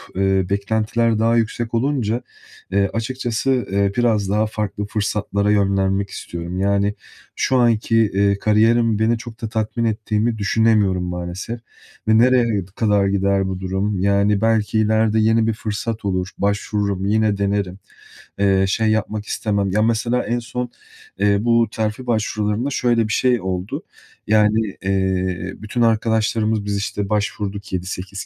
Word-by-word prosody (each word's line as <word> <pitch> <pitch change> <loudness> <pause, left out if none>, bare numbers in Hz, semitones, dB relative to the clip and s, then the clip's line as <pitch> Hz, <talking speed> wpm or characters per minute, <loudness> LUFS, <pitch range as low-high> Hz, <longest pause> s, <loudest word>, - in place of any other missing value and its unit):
eee, 95 0 +2
beklentiler 110 +3 0
daha 115 +1 +3
yüksek 115 0 -1
olunca, 120 -2 0 0.5
eee, 100 0 +2
açıkçası, 125 +2 -1
eee, 100 0 +2
biraz 110 -5 +2
daha 105 +2 +2
farklı 105 -1 -3
fırsatlara 105 -1 -1
yönlenmek 100 -1 +1
istiyorum. 85 0 -6
Yani, 100 +1 +1 0.4
şu 130 - +1
anki, 115 -2 +2
eee, 100 -2 +2
kariyerim 110 +1 +3
beni 115 +1 +2
çok 115 0 -10
da 110 - -3
tatmin 110 +1 -1
ettiğini 110 +1 0
düşünemiyorum 105 -3 +2
maalesef 90 +6 -5 0.5
ve 110 0 +5
nereye 125 +1 +5 0.3
kadar 105 -3 +2
gider 100 0 +1
bu 95 -1 -4
durum? 95 +1 -2
Yani, 100 +1 +2
belki 110 -1 +2
ileride 110 0 +2
yeni 110 +1 +3
bir 115 - +1
fırsat 110 0 -4
olur, 95 -1 -1
başvururum, 100 -1 -1
yine 105 0 +2
denerim. 100 -1 -1 0.6
Eee, 95 -1 +3
şey, 110 +2 +1
yapmak 110 -1 -1
istemem 100 -3 -1
Ya, 105 +3 +2
mesela, 115 +2 +1
en 120 +1 -1
son 125 +1 -4 0.7
bu 115 +1 +3
terfi 110 +3 -3
başvurularında 110 +1 0
şöyle 120 -4 +1
bir 105 - -2
şey 125 -2 +2
oldu. 95 +1 -4 0.4
Yani, 105 -1 +2
eee, 95 -1 -1
bütün 110 +3 -3
arkadaşlarımız, 110 -1 +1
biz 100 0 -1
işte 100 0 -3
başvurduk. 100 -1 -3
7-8 95 +2 -4
105 Hz, 140 wpm, -20 LUFS, 100-115 Hz, 0.7 s, ve